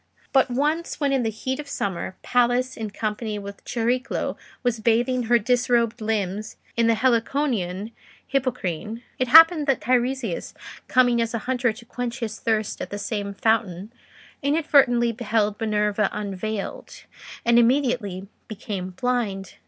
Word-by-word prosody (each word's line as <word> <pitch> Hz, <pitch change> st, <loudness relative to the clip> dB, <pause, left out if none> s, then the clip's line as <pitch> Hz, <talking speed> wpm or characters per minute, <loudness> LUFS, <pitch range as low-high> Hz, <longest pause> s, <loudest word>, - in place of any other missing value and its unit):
But 265 Hz, -1 st, +4 dB
once 300 Hz, +7 st, -1 dB
when 285 Hz, -2 st, +1 dB
in 265 Hz, -, +2 dB
the 225 Hz, -, 0 dB
heat 260 Hz, +5 st, -4 dB
of 290 Hz, -1 st, -7 dB
summer, 190 Hz, -6 st, -3 dB
Pallas, 245 Hz, +1 st, +2 dB
in 220 Hz, -1 st, -4 dB
company 215 Hz, +1 st, -3 dB
with 200 Hz, 0 st, -9 dB
Chariclo, 245 Hz, +3 st, -1 dB, 0.3 s
was 245 Hz, -2 st, 0 dB
bathing 240 Hz, +3 st, +1 dB
her 240 Hz, -, +6 dB
disrobed 240 Hz, 0 st, +1 dB
limbs 215 Hz, -1 st, -2 dB, 0.2 s
in 235 Hz, -1 st, +3 dB
the 230 Hz, -, +4 dB
Heliconian 230 Hz, -5 st, 0 dB, 0.4 s
Hippocrene, 230 Hz, -, -2 dB, 0.2 s
it 255 Hz, -, +1 dB
happened 325 Hz, +2 st, +8 dB
that 270 Hz, -3 st, +2 dB
Teiresias 245 Hz, -3 st, -1 dB, 0.3 s
coming 245 Hz, -2 st, +3 dB
as 230 Hz, 0 st, -1 dB
a 230 Hz, -, -5 dB
hunter 250 Hz, -2 st, +1 dB
to 235 Hz, +1 st, -14 dB
quench 245 Hz, 0 st, -4 dB
his 220 Hz, -3 st, -5 dB
thirst 220 Hz, -2 st, -1 dB
at -, -, -5 dB
the 205 Hz, -, -5 dB
same 205 Hz, -1 st, -4 dB
fountain, 215 Hz, -2 st, 0 dB, 0.5 s
inadvertently 280 Hz, -5 st, +3 dB
beheld 215 Hz, -2 st, -1 dB
Minerva 210 Hz, -1 st, +1 dB
unveiled, 210 Hz, 0 st, -5 dB, 0.4 s
and 235 Hz, 0 st, +5 dB
immediately 235 Hz, -7 st, +1 dB, 0.2 s
became 190 Hz, -3 st, -6 dB
blind. 220 Hz, -7 st, -1 dB
230 Hz, 140 wpm, -24 LUFS, 210-255 Hz, 0.5 s, happened